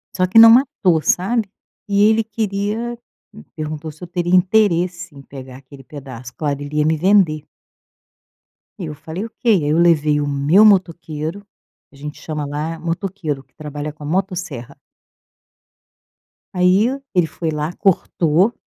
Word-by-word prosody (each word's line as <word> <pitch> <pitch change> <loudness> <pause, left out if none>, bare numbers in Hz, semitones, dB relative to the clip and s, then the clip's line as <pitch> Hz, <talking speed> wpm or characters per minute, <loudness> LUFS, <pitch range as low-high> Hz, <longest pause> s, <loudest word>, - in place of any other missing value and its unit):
Só 185 - +2
que 205 +5 +5
não 225 0 +10
matou 225 - +3
sabe, 205 +7 0 0.4
e 200 0 +2
ele 220 0 +2
queria 220 +2 -3 0.3
me 215 - -14
perguntou 155 0 -5
se 155 +3 -15
eu 175 - -7
teria 175 +1 0
interesse 180 -3 +1
em 140 - -11
pegar 130 -2 -11
aquele 135 0 -15
pedaço 130 -3 -10
claro, 145 -2 -3
ele 145 +1 -5
ia 150 - +2
me 160 0 +1
vender. 175 -4 +3 1.4
E 180 - -4
eu 150 - -6
falei: 170 +7 -5
"Ok." 230 - -14
Aí 180 -10 +3
eu 155 - +2
levei 155 -3 +3
o 145 - -2
meu 145 +8 +3
motoqueiro, 170 -4 +1 0.5
que - - -22
a - - -16
gente 150 +1 -9
chama 150 -2 -4
lá 150 +3 -4
é - - -12
motoqueiro 165 -3 -4
que - - -42
trabalha 150 0 -6
com 150 0 -14
a - - -6
motosserra. 180 - -4 1.8
Aí 185 +4 +3 0.3
ele 175 -3 +3
foi 160 0 -4
lá, 150 +2 -3
cortou. 180 +1 +1
165 Hz, 160 wpm, -19 LUFS, 150-195 Hz, 1.8 s, não